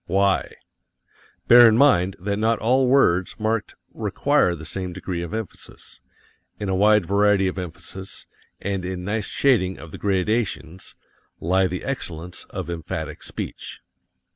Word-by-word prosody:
Why? 100 0 +1 0.9
Bear 120 -1 +9
in 110 - +2
mind 95 -9 +4
that 100 +2 -2
not 115 +1 +2
all 125 +4 +2
words 95 -9 +3
marked 110 0 -2 0.2
require 90 - +1
the 80 -1 -10
same 90 +1 -5
degree 90 -1 -4
of 85 - -6
emphasis 110 -2 -8 0.6
in 105 -2 -3
a 95 - +1
wide 105 0 +4
variety 100 0 +3
of 95 0 -3
emphasis, 90 +2 -8 0.3
and 100 -2 -3
in 90 0 -4
nice 105 +2 -1
shading 105 -9 +2
of 80 -1 -11
the - - -9
gradations, 95 -4 -2 0.4
lie 95 +3 +2
the 90 0 -5
excellence 90 -10 -5
of 95 -4 -6
emphatic 85 -2 -5
speech. - - -6
95 Hz, 140 wpm, -23 LUFS, 90-110 Hz, 0.9 s, Bear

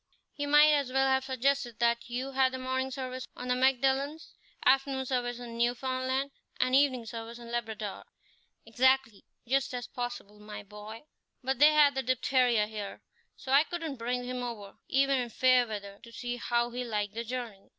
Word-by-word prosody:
"He 290 0 -3
might 295 +1 +7
as 285 -3 +1
well 270 +1 +3
have 265 0 +2
suggested 265 -2 0
that 235 0 +1
you 255 +3 -3
had 260 -1 +1
morning 260 +1 -1
service 255 -1 -5
on 250 - -6
the - - +4
Magdalens, 270 +4 +1 0.3
afternoon 270 0 +3
service 245 -2 -1
in 235 -1 -8
Newfoundland, 260 +3 0 0.3
and 255 0 +2
evening 265 -4 +3
service 230 +1 -7
in 235 -1 -10
Labrador." 220 -3 -4 0.6
"Exactly, 255 -1 +2 0.2
just 270 0 +1
as 245 -1 -4
possible, 245 -5 -6
my 210 0 -8
boy; 210 +3 -10 0.4
but 265 0 -1
they 300 +1 +7
had 295 -2 +6
the 265 - -1
diphtheria 250 -3 +2
here, 210 -2 -7 0.3
so 265 - -7
I 280 +2 +7
couldn't 325 -4 -5
bring 245 +2 -2
him 250 0 -4
over, 220 -5 -7
even 275 0 +2
in 245 -1 -3
fair 255 +1 +4
weather, 200 -2 -7
to 235 - -13
see 245 +1 -4
how 240 0 0
he 250 +1 -3
liked 210 -3 -2
the 230 +1 -3
journey." 235 -4 -6
250 Hz, 175 wpm, -30 LUFS, 235-265 Hz, 0.6 s, might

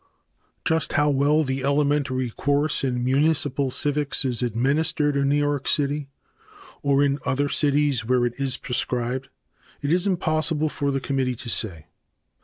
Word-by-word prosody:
Just 160 -2 +1
how 145 0 +3
well 145 +3 +3
the 135 -1 -3
elementary 140 -3 +1
course 145 +5 0
in 125 -2 -1
municipal 140 0 +1
civics 145 0 0
is 125 -2 -1
administered 140 +5 0
in 140 0 +1
New 145 - +3
York 145 -1 -1
City 145 -1 0 0.7
or 140 0 +3
in 140 0 +1
other 140 +2 0
cities 145 -4 +1
where 125 +1 +2
it 120 - -1
is 135 -2 0
prescribed 125 +1 -2 0.5
it 145 +3 +1
is 180 +3 +1
impossible 155 -4 +1
for 140 -1 -2
the 135 -1 0
committee 130 -2 -1
to 120 - -7
say. 85 -10 -2
140 Hz, 150 wpm, -24 LUFS, 130-145 Hz, 0.7 s, how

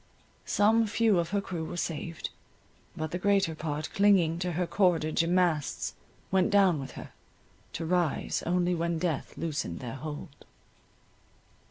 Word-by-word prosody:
Some 220 +2 +3
few 220 -3 +3
of 170 -1 -1
her 200 0 0
crew 175 -4 -4
were 165 - -5
saved, 165 0 -4 0.7
but 155 -1 -3
the 180 - -2
greater 200 -3 +2
part 155 -1 -4
clinging 185 -5 +4
to 180 -1 -2
her 180 +2 0
cordage 170 -4 +2
and 170 +2 +1
masts 170 -6 +1 0.4
went 190 -1 +3
down 195 -6 +4
with 135 -1 -7
her, - - -9 0.6
to 165 - -4
rise 175 -2 0
only 180 0 +2
when 170 0 -1
death 160 -3 -2
loosened 150 - -3
their 120 -2 -6
hold. 150 -1 -8
170 Hz, 150 wpm, -29 LUFS, 160-185 Hz, 0.7 s, clinging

